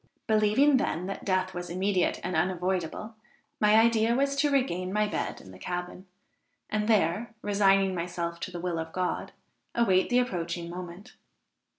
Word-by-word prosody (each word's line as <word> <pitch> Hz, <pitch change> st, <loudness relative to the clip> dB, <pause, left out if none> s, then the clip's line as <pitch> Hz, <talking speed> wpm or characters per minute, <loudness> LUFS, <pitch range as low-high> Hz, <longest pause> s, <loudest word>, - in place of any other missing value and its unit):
Believing, 220 Hz, +7 st, +4 dB
then, 180 Hz, -, -1 dB
that 195 Hz, +1 st, -5 dB
death 185 Hz, -1 st, 0 dB
was 175 Hz, 0 st, -5 dB
immediate 185 Hz, +1 st, 0 dB
and 180 Hz, -1 st, -2 dB
unavoidable, 180 Hz, +4 st, -1 dB, 0.5 s
my 210 Hz, 0 st, +5 dB
idea 225 Hz, 0 st, +4 dB
was 275 Hz, +1 st, +1 dB
to 290 Hz, +1 st, +3 dB
regain 185 Hz, -10 st, 0 dB
my 210 Hz, +1 st, +2 dB
bed 210 Hz, -, -3 dB
in 95 Hz, -, -13 dB
the 95 Hz, -, -13 dB
cabin, 180 Hz, -, -5 dB, 0.6 s
and 215 Hz, 0 st, 0 dB
there, 215 Hz, +2 st, +1 dB
resigning 195 Hz, -2 st, +3 dB
myself 170 Hz, -1 st, -3 dB
to -, -, -4 dB
the 175 Hz, -, -6 dB
will 170 Hz, -1 st, -2 dB
of 160 Hz, 0 st, -6 dB
God, 185 Hz, -1 st, -2 dB, 0.4 s
await 190 Hz, -6 st, +3 dB
the 245 Hz, -, +3 dB
approaching 170 Hz, -7 st, -2 dB
moment. 180 Hz, +2 st, -8 dB
185 Hz, 160 wpm, -28 LUFS, 175-215 Hz, 0.6 s, my